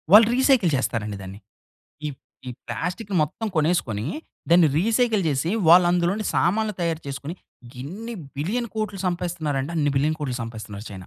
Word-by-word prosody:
వాళ్ళు 210 +2 +9
రీసైకిల్ 260 - +4
చేస్తారండి 110 -5 -2
దాన్ని. 95 +1 -9 0.7
ఈ - - -1 0.4
ఈ - - -3 0.2
ప్లాస్టిక్ 195 +5 -4
మొత్తం 155 +9 -3
కొనేసుకొని 150 - +1 0.4
దాన్ని 170 -2 +6
రీసైకిల్ 225 +2 +2
జేసి 145 +3 0 0.2
వాళ్ళు 175 +2 +8
అందులో 175 0 +2
నుండి 215 0 -3
సామాన్లు 210 +4 +1
తయారు 165 -2 -1
చేసుకొని 140 +4 -5 0.5
ఇన్ని 215 - -6 0.2
బిలియన్ 220 - -1
కోట్లు 215 -2 -3
సంపాయిస్తున్నారంటే, 165 -5 -2
అన్ని 145 -2 +2
బిలియన్ 150 +3 +2
కోట్లు 135 -5 -3
సంపాయిస్తున్నారు 110 -2 -7
చైనా! 95 -2 -9
170 Hz, 145 wpm, -24 LUFS, 135-210 Hz, 0.7 s, వాళ్ళు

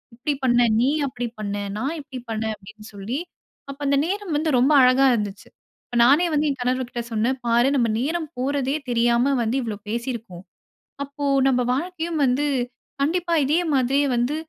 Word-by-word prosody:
இப்பிடி 275 +5 -2
பண்ண 240 -2 +3 0.2
நீ! 255 +4 +3 0.2
அப்பிடி 245 -1 -4
பண்ண 205 -1 -3 0.2
நான், 270 +8 -2
இப்பிடி 265 -4 -9
பண்ண 220 0 -2
அப்பிடின்னு 210 +2 -14
சொல்லி 210 +8 -4 0.5
அப்ப 275 - -12
அந்த 280 0 +3
நேரம் 390 -1 -3
வந்து 315 +2 0
ரொம்ப 265 +5 +3
அழகா 255 +1 +5
இருந்துச்சு. 210 -3 -3 0.4
அப்ப - - -9
நானே 290 +7 +5
வந்து 300 0 +2
என் 275 - -3
கணவர்கிட்ட 250 -1 -1
சொன்னேன், 230 +4 0
"பாரு! 235 +2 +3
நம்ம 240 -4 +2
நேரம் 315 +4 -2
போறதே 270 +1 -1
தெரியா 235 0 +2 0.3
வந்து 230 +4 0
இவ்ளோ 220 -2 -3
பேசியிருப்போம். 230 -6 -5 0.6
அப்போ 285 +1 -8 0.2
நம்ம 250 -2 +2
வாழ்க்கையும் 330 +2 -3
வந்து 260 +3 +1 0.6
கண்டிப்பா 340 +4 0
இதே 300 +4 +2 0.2
மாதிரியே 275 +2 +2
வந்து 245 +5 0
260 Hz, 160 wpm, -23 LUFS, 235-290 Hz, 0.6 s, அழகா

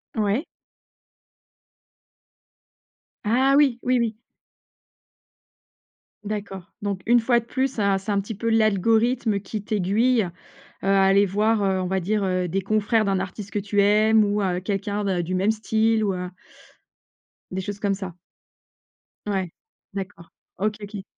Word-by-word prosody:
Ouais. 215 +7 0 2.8
Ah, 255 +6 +3
oui. 265 -5 +3
Oui, 255 0 +2
oui. 225 -2 -1 2.1
D'accord. 200 -3 -6
Donc 200 -2 -2
une 240 0 +6
fois 240 +1 +3
de 230 - -11
plus, 260 +2 0
c'est 215 - -2
un 200 -1 +3
c'est 195 +2 -4
un 200 -1 +1
petit 205 +1 -7
peu 230 +3 -2
l'algorithme 225 +1 +2
qui 205 +1 -6
t'aiguille, 215 +4 +2
heu, 175 - -4 0.6
à 195 0 +4
aller 195 +1 +5
voir, 210 +2 +1
heu, 190 -1 +1
on 180 - -2
va 190 +1 0
dire, 205 +3 -1
heu, 185 -1 0
des 195 +3 -1
confrères 215 +2 +1
d'un 195 -1 +1
artiste 195 +2 -6
que - - -3
tu 205 0 +1
aimes 215 +2 +4
ou 205 0 0
heu, 180 -1 0
quelqu'un 200 +2 -2
d'un 190 -3 0
du 180 +3 -4
même 190 +3 +1
style 220 0 +1
ou 200 -2 +1
heu 180 0 -4 1.2
des 190 +1 -3
choses 205 +1 -6
comme 200 -1 0
ça. 190 -2 -6 1.1
Ouais. 190 -4 -1 0.4
D'accord. 190 -4 -7 0.3
OK, 210 +3 0
OK. 205 -1 -7
205 Hz, 150 wpm, -24 LUFS, 195-220 Hz, 2.8 s, une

